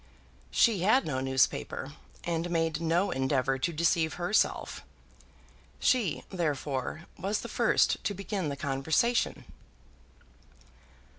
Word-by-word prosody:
She 225 Hz, -5 st, +3 dB
had 220 Hz, +9 st, +3 dB
no 130 Hz, -4 st, -2 dB
newspaper, 130 Hz, +1 st, 0 dB, 0.3 s
and 170 Hz, 0 st, -2 dB
made 165 Hz, -2 st, 0 dB
no 170 Hz, +4 st, +1 dB
endeavour 130 Hz, 0 st, 0 dB
to 170 Hz, -, 0 dB
deceive 160 Hz, 0 st, +1 dB
herself. 180 Hz, +5 st, 0 dB, 1.0 s
She, 235 Hz, -, +1 dB
therefore, 150 Hz, -3 st, -2 dB
was 200 Hz, +3 st, -1 dB
the -, -, -6 dB
first -, -, +2 dB
to 205 Hz, -, -1 dB
begin 195 Hz, -4 st, -3 dB
the 140 Hz, -, -3 dB
conversation. 150 Hz, -, 0 dB
165 Hz, 105 wpm, -29 LUFS, 140-190 Hz, 1.0 s, She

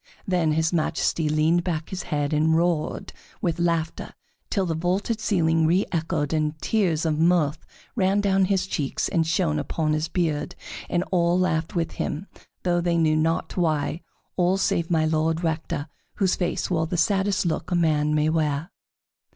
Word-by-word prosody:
Then 175 Hz, -5 st, +2 dB
his 160 Hz, +2 st, +1 dB
Majesty 160 Hz, -1 st, 0 dB
leaned 155 Hz, +3 st, +2 dB
back 165 Hz, -3 st, -3 dB
his 190 Hz, -1 st, -3 dB
head 145 Hz, 0 st, -2 dB
and 160 Hz, +2 st, +3 dB
roared 170 Hz, -2 st, -1 dB, 0.3 s
with 170 Hz, -2 st, -1 dB
laughter 170 Hz, -1 st, -1 dB, 0.3 s
till 195 Hz, -4 st, 0 dB
the 165 Hz, -, -1 dB
vaulted 185 Hz, +7 st, -1 dB
ceiling 165 Hz, -6 st, +2 dB
reëchoed, 165 Hz, -3 st, 0 dB
and 155 Hz, 0 st, -1 dB
tears 175 Hz, -7 st, +1 dB
of 155 Hz, -1 st, 0 dB
mirth 160 Hz, -2 st, +2 dB, 0.3 s
ran 195 Hz, +1 st, +2 dB
down 195 Hz, -1 st, +3 dB
his 190 Hz, -1 st, +1 dB
cheeks 145 Hz, -7 st, -2 dB
and 165 Hz, -4 st, +1 dB
shone 160 Hz, -2 st, +1 dB
upon 155 Hz, +2 st, -1 dB
his 155 Hz, +1 st, 0 dB
beard, 165 Hz, -1 st, -1 dB, 0.3 s
and 175 Hz, 0 st, +1 dB
all 175 Hz, -1 st, +3 dB
laughed 160 Hz, -3 st, 0 dB
with 165 Hz, -1 st, 0 dB
him, 165 Hz, +6 st, -4 dB, 0.4 s
though 175 Hz, -1 st, +1 dB
they 170 Hz, -1 st, +1 dB
knew 155 Hz, -2 st, +3 dB
not 160 Hz, +1 st, 0 dB
why, 160 Hz, -1 st, 0 dB, 0.4 s
all 180 Hz, +1 st, +3 dB
save 170 Hz, -3 st, 0 dB
My 160 Hz, -2 st, +2 dB
Lord 160 Hz, +1 st, 0 dB
Rector, 160 Hz, -2 st, -2 dB, 0.3 s
whose 190 Hz, -3 st, +2 dB
face 175 Hz, +1 st, -2 dB
wore 160 Hz, -2 st, +1 dB
the 175 Hz, -, -2 dB
saddest 195 Hz, +2 st, +1 dB
look 170 Hz, -, -2 dB
a 180 Hz, -, 0 dB
man 150 Hz, -3 st, +2 dB
may 150 Hz, 0 st, +2 dB
wear. 155 Hz, +1 st, 0 dB
165 Hz, 165 wpm, -24 LUFS, 155-180 Hz, 0.4 s, and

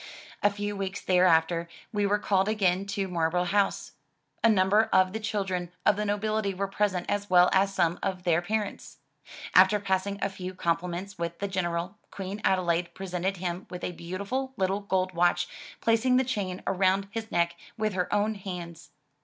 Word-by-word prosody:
A 205 Hz, -, +5 dB
few 205 Hz, 0 st, -4 dB
weeks 195 Hz, 0 st, -3 dB
thereafter 170 Hz, -2 st, +3 dB, 0.2 s
we 205 Hz, -1 st, +1 dB
were 205 Hz, +1 st, +2 dB
called 195 Hz, -1 st, +1 dB
again 195 Hz, -3 st, +1 dB
to 200 Hz, -1 st, -2 dB
Marlborough 175 Hz, 0 st, 0 dB
House. 195 Hz, +3 st, 0 dB, 0.5 s
A 230 Hz, -, +6 dB
number 210 Hz, +2 st, +4 dB
of 185 Hz, 0 st, +4 dB
the 220 Hz, -, -2 dB
children 190 Hz, -5 st, -2 dB
of 210 Hz, -, +5 dB
the 210 Hz, +1 st, -2 dB
nobility 205 Hz, -1 st, -1 dB
were 195 Hz, +1 st, -1 dB
present 195 Hz, -2 st, 0 dB
as 205 Hz, 0 st, -2 dB
well 180 Hz, -1 st, +6 dB
as 195 Hz, +1 st, +3 dB
some 170 Hz, -1 st, +1 dB
of 185 Hz, -2 st, -2 dB
their 170 Hz, -1 st, +2 dB
parents. 210 Hz, +3 st, -3 dB, 0.6 s
After 190 Hz, +3 st, +6 dB
passing 200 Hz, 0 st, -1 dB
a 195 Hz, -, 0 dB
few 185 Hz, -1 st, -7 dB
compliments 175 Hz, +3 st, -2 dB
with 170 Hz, 0 st, -3 dB
the 200 Hz, -, -2 dB
General, 180 Hz, +1 st, -2 dB
Queen 195 Hz, +2 st, -6 dB
Adelaide 175 Hz, -2 st, +1 dB
presented 190 Hz, 0 st, -2 dB
him 175 Hz, +1 st, -4 dB
with 180 Hz, -, -7 dB
a -, -, -2 dB
beautiful 200 Hz, +10 st, -4 dB
little 190 Hz, 0 st, +1 dB
gold 185 Hz, -2 st, -1 dB
watch, 175 Hz, 0 st, +2 dB, 0.3 s
placing 230 Hz, +3 st, +3 dB
the 260 Hz, -, +4 dB
chain 195 Hz, -7 st, -3 dB
around 195 Hz, +1 st, +2 dB
his 225 Hz, 0 st, -5 dB
neck 170 Hz, 0 st, +1 dB, 0.2 s
with 215 Hz, -1 st, 0 dB
her 180 Hz, -1 st, -1 dB
own 210 Hz, +1 st, +2 dB
hands. 175 Hz, -6 st, -7 dB
190 Hz, 175 wpm, -28 LUFS, 180-205 Hz, 0.6 s, A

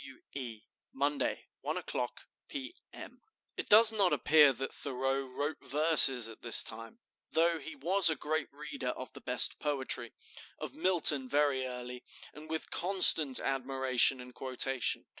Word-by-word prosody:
W. 135 Hz, -1 st, -15 dB
E. 120 Hz, -6 st, -8 dB, 0.3 s
"Monday, 140 Hz, +1 st, -4 dB
1 -, -, -5 dB
o'clock -, -, -7 dB, 0.2 s
P. 280 Hz, +4 st, -9 dB, 0.2 s
M." -, -, -14 dB, 0.3 s
It -, -, -7 dB
does 220 Hz, +1 st, +6 dB
not 200 Hz, -5 st, 0 dB
appear 150 Hz, -2 st, +3 dB
that 135 Hz, +1 st, -7 dB
Thoreau 135 Hz, 0 st, -4 dB
wrote 145 Hz, +3 st, -6 dB
verses 135 Hz, -4 st, +6 dB
at 115 Hz, -, -13 dB
this 120 Hz, -, +6 dB
time, 115 Hz, -, -10 dB, 0.3 s
though 165 Hz, 0 st, -1 dB
he 160 Hz, +2 st, -11 dB
was 175 Hz, +5 st, +5 dB
a 160 Hz, -, -1 dB
great 155 Hz, +1 st, -5 dB
reader 145 Hz, -2 st, -9 dB
of 130 Hz, +1 st, -8 dB
the -, -, -13 dB
best 125 Hz, 0 st, -1 dB
poetry, 130 Hz, -5 st, -3 dB, 0.5 s
of -, -, -9 dB
Milton 155 Hz, -8 st, +3 dB
very 140 Hz, -2 st, -1 dB
early, 125 Hz, 0 st, -10 dB, 0.3 s
and 155 Hz, +1 st, -14 dB
with 160 Hz, 0 st, -6 dB
constant 170 Hz, -7 st, +3 dB
admiration 130 Hz, -1 st, -1 dB
and 125 Hz, 0 st, -13 dB
quotation. 130 Hz, -1 st, -3 dB
135 Hz, 150 wpm, -29 LUFS, 130-155 Hz, 0.5 s, does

